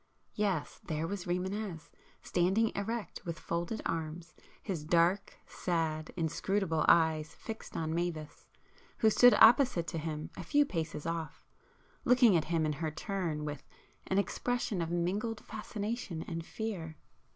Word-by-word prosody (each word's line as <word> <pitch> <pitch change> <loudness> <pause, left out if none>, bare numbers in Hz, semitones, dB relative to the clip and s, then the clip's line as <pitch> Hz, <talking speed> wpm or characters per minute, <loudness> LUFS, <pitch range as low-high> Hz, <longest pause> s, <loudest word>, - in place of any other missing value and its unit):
Yes, 195 -8 -1
there 155 -1 -2
was 190 +1 -4
Rimânez,—standing 185 +2 -1
erect 225 +2 -4
with 170 -2 -4
folded 170 +6 -3
arms, 165 0 -3 0.3
his 180 -7 -3
dark, 170 +5 +2
sad, 160 -3 -2
inscrutable 165 +1 0
eyes 160 -2 +4
fixed 225 -1 -7
on 160 -1 -1
Mavis, 165 -3 -3 0.5
who 220 - +4
stood 245 +3 +7
opposite 230 - +6
to 165 - -3
him 155 -1 -4
a 185 - -6
few 290 - +3
paces 160 - -3
off, 165 -1 -4 0.6
looking 245 -5 +6
at 160 - +2
him 165 -1 +1
in 155 - 0
her 155 +2 -2
turn 165 -2 -3
with 145 -2 -4 0.5
an 190 - +1
expression 240 0 0
of 165 - -2
mingled 200 +6 -1
fascination 210 -5 -4
and 165 -1 -5
fear. 180 -8 -4
175 Hz, 135 wpm, -32 LUFS, 160-205 Hz, 0.6 s, stood